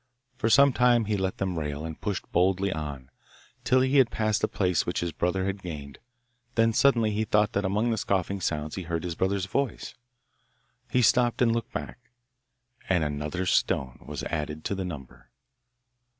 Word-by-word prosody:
For 115 - 0
some 140 +3 +6
time 120 -2 +4
he 105 0 0
let 95 -1 -2
them 95 -3 -2
rail, 75 0 -4
and 80 -1 -7
pushed 100 -3 -4
boldly 95 +2 +2
on, 70 -4 -6 0.5
till 130 0 +3
he 130 +2 +2
had 130 -4 +5
passed 110 -1 0
the - - +2
place 90 -4 +1
which - - -2
his 85 -1 -2
brother 90 +4 -1
had 95 0 -3
gained; 75 -6 -7 0.6
then 115 0 +3
suddenly 115 -4 +3
he 105 +1 0
thought 105 0 +2
that 100 0 0
among 105 +5 +1
the 110 - 0
scoffing 100 0 -1
sounds 75 -2 -2
he 95 - -4
heard 85 -2 -3
his 90 -2 -3
brother's 95 +2 0
voice. 135 +7 -2 1.0
He 125 - +2
stopped 120 0 +3
and 120 -2 +4
looked 115 +1 -3
back; - - -6 0.9
and 90 -4 +3
another 75 +5 -2
stone 65 -7 +1
was - - -6
added 75 -1 -4
to - - -1
the 95 -1 -3
number. 75 -7 -9
95 Hz, 180 wpm, -27 LUFS, 80-110 Hz, 1.0 s, some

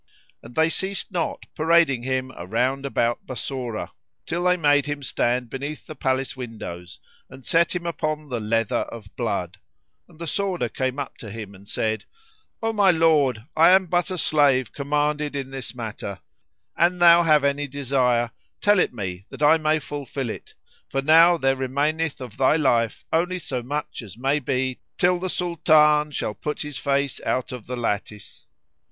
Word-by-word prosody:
And 120 - -13
they 160 0 +4
ceased 195 +3 -3
not 175 -3 -2
parading 160 -5 +3
him 130 +1 -2
round 125 +9 -1
about 120 -3 -1
Bassorah, 125 -2 -4 0.3
till 175 +2 -2
they 180 0 +4
made 145 -3 +3
him 145 -1 -4
stand 125 -1 0
beneath 140 +5 -6
the - - -8
palace 130 -2 -1
windows 110 -8 -8 0.3
and 130 -1 -13
set 170 +1 +2
him 175 -1 -3
upon 155 -2 -2
the 125 -4 -3
leather 115 0 0
of 110 -3 -11
blood,[FN#74] 95 - -6
and 170 - -18
the 170 - -6
sworder 185 - -1
came 130 0 -1
up 140 -2 -5
to 110 - -9
him 105 -1 -8
and 100 +1 -16
said, 110 +1 -2 0.6
"O 225 0 0
my 205 -3 +4
lord, 155 -9 +3
I 165 +2 +7
am 190 +1 +6
but 175 +2 0
a 185 - -3
slave 140 -6 +2
commanded 150 +1 -1
in 135 -1 -4
this 130 -3 -6
matter: 110 -4 -6 0.6
an 175 +2 +3
thou 170 -1 +7
have 155 -3 +4
any 140 +1 0
desire, 130 -4 +1 0.3
tell 205 -1 +4
it 125 - +1
me 95 -2 -5
that - - -6
I 160 +2 +6
may 155 0 +2
fulfil 140 -4 -5
it, - - -10 0.3
for 135 0 -1
now 165 +3 +6
there 135 -3 +2
remaineth 145 +4 -1
of 120 -4 -8
they 135 +4 +4
life 120 -6 +1
only 180 +3 +1
so 130 -8 -4
much 145 +4 -4
as 110 -2 -11
may 135 +4 +1
be 130 -1 -1 0.2
till 180 -1 +3
the 185 +1 -3
Sultan 155 -4 +3
shall 130 -6 -3
put 150 +8 -4
his 150 -2 -5
face 140 -1 0
out 130 +1 -1
of 125 -5 -8
the 125 0 -4
lattice." 105 -3 -4
140 Hz, 175 wpm, -24 LUFS, 120-160 Hz, 0.6 s, I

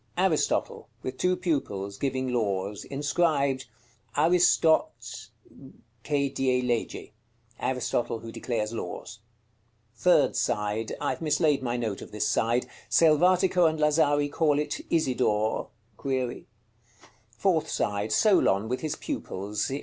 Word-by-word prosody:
_ - - -39
Aristotle, - - 0
with 130 0 -5
two 180 0 +2
pupils, 135 - -2
giving 130 -2 -1
laws. 100 -3 -1
Inscribed: 140 -2 0 0.5
"ARISTOT 165 0 +4 1.1
CHE 140 -2 0
DIE 130 -2 +1
LEGE." 120 -2 -2 0.5
Aristotle 120 -2 -1
who 115 0 -8
declares 115 -2 -3
laws. 115 - -6 0.8
Third - - +3
side. 105 +2 -1
I - - 0
have 130 - -6
mislaid 150 -2 +2
my 120 -1 -2
note 110 -5 -3
of - - -10
this 105 0 -1
side: 120 +3 +1 0.2
Selvatico 175 +2 +4
and 160 - -4
Lazari 150 -1 +3
call 150 -2 +2
it 150 0 -2
"Isidore" 125 -8 +1
(?). 115 -1 -8
Fourth 180 -5 +1
side. 105 +1 -1
Solon 110 - +3
with 125 +2 -2
his 155 -2 -2
pupils. 105 +4 -4
130 Hz, 120 wpm, -27 LUFS, 110-150 Hz, 1.1 s, ARISTOT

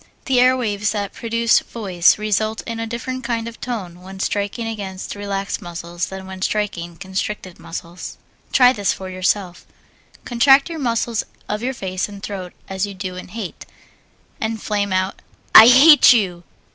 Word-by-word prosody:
The 260 -2 +2
air 255 +1 +5
waves 210 -3 -1
that 205 -2 -3
produce 230 0 +2
voice 185 -6 +1
result 215 +1 -1
in 230 -1 -5
a 225 - -3
different 255 +3 -5
kind 230 -1 -2
of 230 - -10
tone 185 -8 -5
when 190 +1 -10
striking 205 +4 -2
against 200 -4 -5
relaxed 200 -1 -4
muscles 175 0 -5
than 190 0 -8
when 190 0 -9
striking 175 -5 -2
constricted 190 -1 -5
muscles. 170 +1 -8 0.3
Try 250 -1 +6
this 205 -5 0
for 190 -1 -8
yourself. 185 0 -1 0.6
Contract 270 +5 +4
the 330 -1 -5
muscles 235 -3 -1 0.2
of 210 +1 -3
your 260 +2 -2
face 185 -2 -3
and 200 -1 -11
throat 185 -3 -6
as 190 +1 -2
you 200 - -8
do 185 -1 -5
in 185 - -8
hate, 205 -2 -7 0.7
and 220 0 -2
flame 205 -1 -2
out 185 +1 -1 0.3
"I 220 - +11
hate 275 +4 +8
you!" 185 -7 0
205 Hz, 165 wpm, -20 LUFS, 185-230 Hz, 0.7 s, I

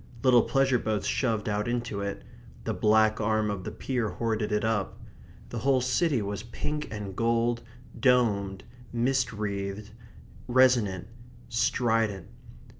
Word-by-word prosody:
Little 125 -2 +6
pleasure 135 -1 +2
boats 110 -2 -1
shoved 115 -5 0
out 105 0 -1
into 120 -4 -2
it; 100 0 -4 0.4
the - - -2
black 110 0 +3
arm 110 0 +1
of 95 -2 -4
the - - -4
pier 125 -5 -2
hoarded 110 +2 -2
it 105 0 +1
up. 105 -3 -1 0.5
The 120 - -4
whole 135 +2 +3
city 130 0 +1
was 100 0 -4
pink 150 +7 -4
and 105 -3 -6
gold; 115 +1 +1 0.4
domed; 100 -7 +2 0.3
mist 125 +2 +1
wreathed; 100 -1 -4 0.6
resonant; 120 -7 +3 0.4
strident. 115 -5 +1
110 Hz, 130 wpm, -28 LUFS, 105-125 Hz, 0.6 s, Little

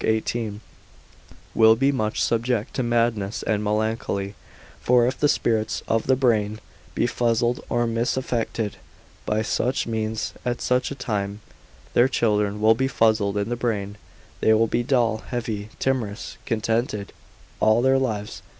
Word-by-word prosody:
18) 110 -1 -1 0.9
will 110 0 +6
be 135 +4 +2
much 110 -5 -1
subject 115 -1 0
to - - -1
madness 115 -4 0
and 105 -1 0
melancholy; 105 -2 -1 0.5
for 125 -1 +4
if 130 +1 -1
the 145 - +3
spirits 110 -4 0
of 115 0 0
the 130 - +5
brain 110 -5 +1 0.4
be - - +2
fuzzled, 120 0 0
or 120 0 +1
misaffected 115 -2 -1 0.5
by 110 +1 +1
such 125 +4 0
means, 110 -1 -2
at 120 0 -2
such 125 0 +1
a 140 - -5
time, 105 -5 -3 0.5
their 120 - +5
children 105 -5 +1
will 110 +1 +5
be 130 +4 0
fuzzled 110 -5 +2
in 100 +2 -1
the 120 - -1
brain: 105 -4 -2 0.4
they 110 - +4
will 115 +1 +4
be 115 - 0
dull, 120 -3 +1
heavy, 110 -4 -4
timorous, 120 -5 -2
discontented 110 -2 -1 0.5
all 110 +2 +4
their 135 0 +4
lives. 105 -5 -3
115 Hz, 145 wpm, -24 LUFS, 105-120 Hz, 0.9 s, will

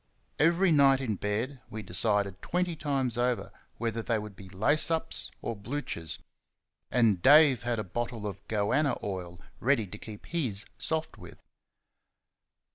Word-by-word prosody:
Every 170 +4 +4
night, 140 -3 +5
in 125 -5 -2
bed, 115 +7 -3
we 110 0 -6
decided 100 0 +2
twenty 180 -1 -1
times 135 -6 +1
over 125 0 0 0.3
whether 115 0 -2
they 115 0 0
would 105 -2 -7
be 95 0 -12
lace 110 - +3
ups 165 0 +2
or 115 - -3
bluchers, 105 - -5 0.7
and 110 -7 +2
Dave 145 - +6
had 120 -1 -1
a 110 - -2
bottle 115 +2 -4
of 100 -2 -5
"goanna" 115 +8 +1
oil 90 -3 -5 0.2
ready 125 -3 +2
to 105 +2 -10
keep 105 -2 -10
his 125 -12 -2
soft 160 0 -2
with. - - -12
115 Hz, 145 wpm, -29 LUFS, 105-145 Hz, 0.7 s, Dave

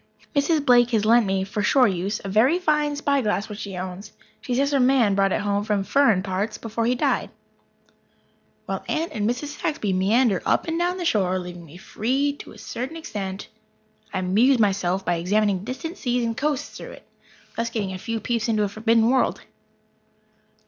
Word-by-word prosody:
Mrs. 290 +1 +2
Blake 245 -2 +5
has 220 -3 +1
lent 230 -1 +5
me, 190 0 0
for 205 +2 -3
shore 250 +4 +4
use, 195 +2 -2
a - - -3
very 225 - +3
fine 300 -4 +1
spyglass 275 -8 0
which 210 -1 -8
she 195 -3 -6
owns. 185 +3 -6 0.3
She 255 -4 -2
says 280 +3 +1
her 280 - +2
"man" 250 -5 +4
brought 195 0 +2
it - - 0
home 205 0 0
from 210 -2 0
"furrin' 225 -6 +3
parts" 200 +3 -2
before 230 0 -2
he 250 - +2
died. - - 0 1.4
While - - -4
Aunt 325 +1 -1
and 210 0 -1
Mrs. 285 +5 -4
Saxby 215 - -1
meander 200 +2 +2
up - - +1
and 325 +1 -1
down 355 +1 0
the 355 - -4
shore, 190 - +1
leaving 175 -1 -7
me 160 +4 -13
free 265 +9 -1
to - - -10
a - - -14
certain 260 +7 -6
extent, 200 -10 -6 0.6
I 195 - -3
amuse 210 +9 +3
myself 195 -3 +1
by 175 -1 +1
examining 195 +2 +1
distant 320 - -6
seas 245 -1 0
and 230 0 -2
coasts 290 +1 -2
through - - -9
it, - - -15 0.5
thus 230 0 -1
getting 205 -5 -3
a 185 - -6
few 230 +3 -3
peeps 235 -1 -1
into 215 -2 +1
a 205 - -1
forbidden 225 +2 +2
world. 260 +1 +1
225 Hz, 190 wpm, -23 LUFS, 195-265 Hz, 1.4 s, Blake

